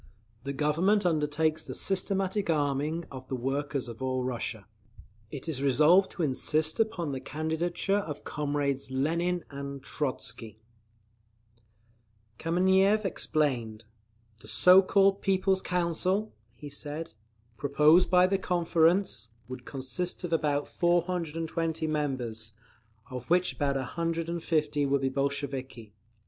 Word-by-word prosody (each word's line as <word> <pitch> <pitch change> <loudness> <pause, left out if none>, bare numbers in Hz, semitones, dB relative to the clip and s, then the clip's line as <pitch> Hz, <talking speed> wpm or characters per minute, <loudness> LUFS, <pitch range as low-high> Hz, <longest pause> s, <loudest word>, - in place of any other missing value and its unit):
The 140 - -3
Government 165 +9 +2
undertakes 155 -1 0
the - - -5
systematic 195 0 0
arming 150 +2 0
of 130 -1 -9
the 130 - -3
workers 135 +2 -2
of 115 +1 -9
all 130 -1 -1
Russia. 120 -4 -4 0.6
It 140 +4 -8
is 145 -5 -2
resolved 150 +8 +5
to 175 - -2
insist 155 +3 +1
upon 175 -9 0
the 135 - -3
candidature 160 +7 -1
of 150 -7 -6
comrades 145 -2 -2
Lenin 170 +6 0
and 140 -1 -7
Trotzky. 115 -6 -4 1.8
Kameniev 190 +5 +3
explained. 125 - -1 0.6
"The - - -15
so 180 +1 +7
called 195 +1 +3
'People's 190 0 +1
Council,'" 180 +4 -1 0.2
he 145 +5 -10
said, 150 +3 -5 0.4
"proposed 150 +8 +4
by 180 0 +6
the 190 +1 +1
Conference, 170 - +1 0.2
would 125 0 -8
consist 135 +8 -3
of 175 -2 -3
about 145 -3 +1
420 165 -2 -1
members, 125 -8 -2 0.6
of 125 -1 -7
which 180 +1 +3
about 140 -3 -1
150 165 +1 -1
would 140 0 +1
be 135 - +1
Bolsheviki. 135 -5 -3
155 Hz, 115 wpm, -29 LUFS, 135-175 Hz, 1.8 s, so